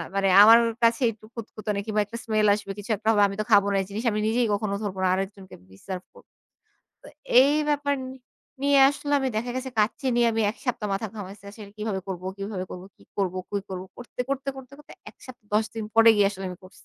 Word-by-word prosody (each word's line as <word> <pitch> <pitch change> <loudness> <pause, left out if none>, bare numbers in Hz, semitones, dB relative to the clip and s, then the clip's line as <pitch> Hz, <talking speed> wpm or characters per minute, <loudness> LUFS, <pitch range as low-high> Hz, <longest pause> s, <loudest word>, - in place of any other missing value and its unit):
মানে 195 0 +2
আমার 225 +2 +9 0.3
কাছে 230 +2 +3
একটু 215 -1 -16
খুঁতখুঁতআনি 215 -2 -5
কিংবা 215 -1 0
একটা 230 +3 -8
স্মেল 215 -1 +2
আসবে 205 -1 -4
কিছু 205 +3 -10
একটা 215 +2 -9
হবে। 210 -2 +3
আমি 195 - -6
তো - - -1
খাবো 200 -1 +6
না - - 0
এই - - -5
জিনিস 215 +4 -5
আমি 210 - -1
নিজেই 235 +2 +1
কখনো 200 0 -1
ধরব 200 -3 -4
না। - - +3
আরেকজনকে 195 0 -5
কি 95 - -16
সার্ভ 185 -1 -5
করব। - - -19 0.7
তো - - -14 0.3
এই 280 +2 +5 0.2
ব্যাপার 290 -1 +1
নি - - -7 0.5
নিয়ে 280 0 +4
আসলে 285 0 -5
আমি 265 - 0
দেখা 235 +3 -2
গেছে 260 0 -4
কাচ্চি 215 +5 0
নিয়ে 240 -1 +4
আমি 225 - 0
১ 230 - -12
সপ্তাহ 225 -4 -2
মাথা 200 +3 -2
ঘামাইছি। 200 -1 -9
আসলে 205 -1 -12
কিভাবে 210 -3 -2
করব 180 -2 -5
কিভাবে 195 -2 -4
করবো, 180 +1 -8
কি - - -22 0.2
করব 185 -2 0 0.2
কি 205 - -2
করব? 185 -1 -5
করতে, 245 0 -9
করতে, 275 0 -2
করতে, 265 0 -11
করতে 295 - -15 0.2
১ - - -32
সপ্তাহ 245 -4 -13
১০ 215 +1 +3
দিন 225 -1 -4
পরে 225 0 +7
গিয়ে 205 -1 +4
আসলে 195 -1 -8
আমি 180 - -8
করছি। 185 - -13
215 Hz, 230 wpm, -25 LUFS, 195-235 Hz, 0.7 s, আমার